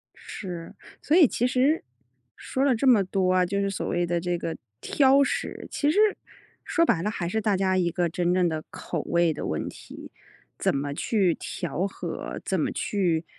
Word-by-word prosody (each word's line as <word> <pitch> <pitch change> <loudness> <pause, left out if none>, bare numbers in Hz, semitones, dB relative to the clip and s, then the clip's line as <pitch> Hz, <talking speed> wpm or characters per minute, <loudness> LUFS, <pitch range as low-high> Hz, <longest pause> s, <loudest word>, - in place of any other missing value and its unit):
是， 175 -4 -8 0.3
所 305 - +2
以 340 -5 +8
其 240 - -1
实， 265 +5 +2 0.5
说 265 - -2
了 275 -3 +3
这 265 +4 0
么 230 -6 +6
多 185 -1 +1
啊， 185 -1 +3
就 200 +3 -1
是 200 0 0
所 195 - -3
谓 175 0 0
的 175 0 0
这 175 0 -1
个 165 -1 -4 0.3
挑 275 0 +4
食， - - -3
其 290 - +1
实 325 - -2 0.7
说 335 - +2
白 170 - +2
了 205 - -1
还 185 -5 -3
是 220 +5 -1
大 205 -2 +1
家 190 0 +1
一 175 -2 +2
个 175 +1 0
真 175 +1 0
正 180 -1 +3
的 155 -2 -3
口 165 - -4
味 170 -1 +2
的 - - -5
问 - - -2
题。 - - -10 0.5
怎 - - +1
么 140 +1 -2
去 190 +2 +1
调 175 +2 -3
和， 195 - -6
怎 - - 0
么 - - 0
去， 175 -5 0
185 Hz, 210 characters per minute, -26 LUFS, 175-225 Hz, 0.7 s, 以